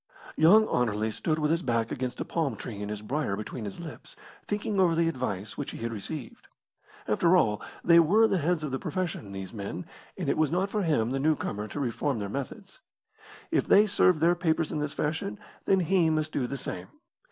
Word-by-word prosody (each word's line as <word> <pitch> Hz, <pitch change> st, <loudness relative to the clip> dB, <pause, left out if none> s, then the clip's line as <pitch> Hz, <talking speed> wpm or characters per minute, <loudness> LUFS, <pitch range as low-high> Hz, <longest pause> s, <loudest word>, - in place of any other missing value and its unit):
Young 210 Hz, +8 st, +6 dB
Anerley 110 Hz, -2 st, 0 dB
stood 155 Hz, +8 st, -1 dB
with 150 Hz, -1 st, +1 dB
his 165 Hz, +1 st, +1 dB
back 115 Hz, -6 st, 0 dB
against 130 Hz, -2 st, -3 dB
a -, -, -2 dB
palm 150 Hz, -8 st, -1 dB
tree 105 Hz, -1 st, -7 dB
and 105 Hz, -, -4 dB
his 105 Hz, 0 st, -5 dB
briar 130 Hz, -3 st, -1 dB
between 110 Hz, +2 st, -6 dB
his 100 Hz, -, -7 dB
lips, 165 Hz, -3 st, -9 dB, 0.3 s
thinking 205 Hz, -1 st, -1 dB
over 175 Hz, -3 st, +4 dB
the 165 Hz, 0 st, +2 dB
advice 110 Hz, -, -3 dB
which -, -, -3 dB
he -, -, -7 dB
had 115 Hz, 0 st, -4 dB
received. 115 Hz, +4 st, -6 dB, 0.6 s
After 170 Hz, +12 st, +4 dB
all, 105 Hz, -, +2 dB, 0.2 s
they 170 Hz, 0 st, +7 dB
were 205 Hz, +8 st, +5 dB
the 195 Hz, -, +1 dB
heads 165 Hz, +1 st, 0 dB
of 150 Hz, -, -3 dB
the 135 Hz, -, -2 dB
profession, 175 Hz, -, -3 dB
these 95 Hz, 0 st, -6 dB
men, 100 Hz, -3 st, -5 dB, 0.3 s
and -, -, -3 dB
it -, -, +1 dB
was 155 Hz, -2 st, +2 dB
not 190 Hz, +3 st, 0 dB
for 210 Hz, -, 0 dB
him, 145 Hz, -, +1 dB
the 135 Hz, -, -1 dB
newcomer, 135 Hz, -8 st, 0 dB
to 145 Hz, -, -6 dB
reform 135 Hz, +1 st, -1 dB
their 100 Hz, -2 st, -4 dB
methods. 135 Hz, +3 st, -6 dB, 0.7 s
If -, -, +1 dB
they 205 Hz, +2 st, +7 dB
served 185 Hz, -5 st, +3 dB
their 170 Hz, +2 st, +5 dB
papers 165 Hz, -2 st, 0 dB
in 155 Hz, -, -2 dB
this 150 Hz, -1 st, -3 dB
fashion, 160 Hz, +7 st, -2 dB, 0.3 s
then 190 Hz, -1 st, +3 dB
he 175 Hz, -1 st, +3 dB
must 155 Hz, 0 st, 0 dB
do 130 Hz, -5 st, -1 dB
the 140 Hz, -, -4 dB
same. 90 Hz, -7 st, -5 dB
150 Hz, 210 wpm, -28 LUFS, 115-170 Hz, 0.7 s, they